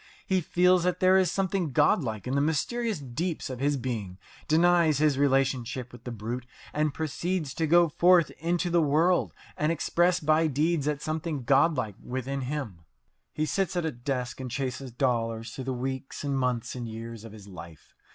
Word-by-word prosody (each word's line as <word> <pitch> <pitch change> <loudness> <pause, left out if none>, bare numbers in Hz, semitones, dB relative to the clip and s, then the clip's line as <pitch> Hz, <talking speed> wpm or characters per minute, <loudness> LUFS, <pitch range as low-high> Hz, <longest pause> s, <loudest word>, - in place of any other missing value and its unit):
He 190 -1 +1
feels 180 +2 +3
that 180 0 0
there 185 0 +5
is 190 -2 +3
something 190 -6 -1
godlike 110 - +2
in 125 - -2
the 140 - +2
mysterious 215 +9 0
deeps 150 +3 -4
of 125 - -6
his 140 +1 +1
being, 110 -8 -4 0.3
denies 165 -1 +4
his 145 -2 +2
relationship 135 -3 +1
with 120 -1 -14
the 125 - -4
brute, 120 +3 -5 0.3
and 150 0 +1
proceeds 160 +1 -2
to 160 - -1
go 170 +2 +5
forth 170 +1 +4
into 175 +2 0
the 170 0 +4
world 160 +5 +2 0.2
and 150 +2 +1
express 175 +2 +2
by 155 +1 +3
deeds 155 +1 0
that 150 -1 -1
something 155 -3 -3
godlike 135 - +2
within 130 +2 -3
him. 130 - -4 0.5
He 155 - -1
sits 190 +3 -1
at 175 -2 0
a 160 - 0
desk 125 0 -4
and 130 -1 -5
chases 130 +1 -4
dollars 115 -2 -1
through 130 - -6
the 130 - -2
weeks 130 +3 -4
and 140 -1 -1
months 125 -3 -1
and 120 -2 -5
years 115 0 -7
of 115 - -10
his 105 -2 -12
life. 85 -4 -12
140 Hz, 180 wpm, -27 LUFS, 125-170 Hz, 0.5 s, there